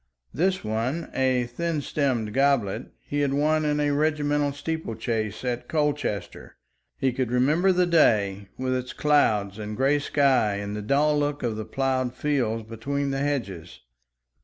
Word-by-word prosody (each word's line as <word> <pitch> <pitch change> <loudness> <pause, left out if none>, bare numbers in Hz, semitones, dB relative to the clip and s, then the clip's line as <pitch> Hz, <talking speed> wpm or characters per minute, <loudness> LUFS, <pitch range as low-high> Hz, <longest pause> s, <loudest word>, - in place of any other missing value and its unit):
This 185 +5 0
one, 115 +9 -2
a 130 -2 +2
thin 155 +7 -2
stemmed 130 -7 -1
goblet, 130 -6 +1 0.2
he 145 - -2
had 140 -1 +1
won 155 +2 +2
in 150 0 +1
a 145 0 +1
regimental 145 -1 +1
steeple 160 -3 -4
chase 110 0 -3
at 125 -1 -2
Colchester; 145 - -2 0.4
he 130 -2 0
could 130 -2 -1
remember 150 +10 +3
the 180 0 +3
day 100 - +2
with 130 0 -1
its 125 0 -3
clouds 110 -9 +2
and 105 0 -5
grey 135 +3 +3
sky 135 -8 +2
and 100 +1 -4
the 105 - -4
dull 145 +7 +2
look 145 -1 -1
of 115 -3 -1
the 110 0 -5
ploughed 130 -2 -1
fields 125 -5 0
between 140 +5 -2
the 135 - -2
hedges. 110 - -3
135 Hz, 160 wpm, -25 LUFS, 110-145 Hz, 0.4 s, remember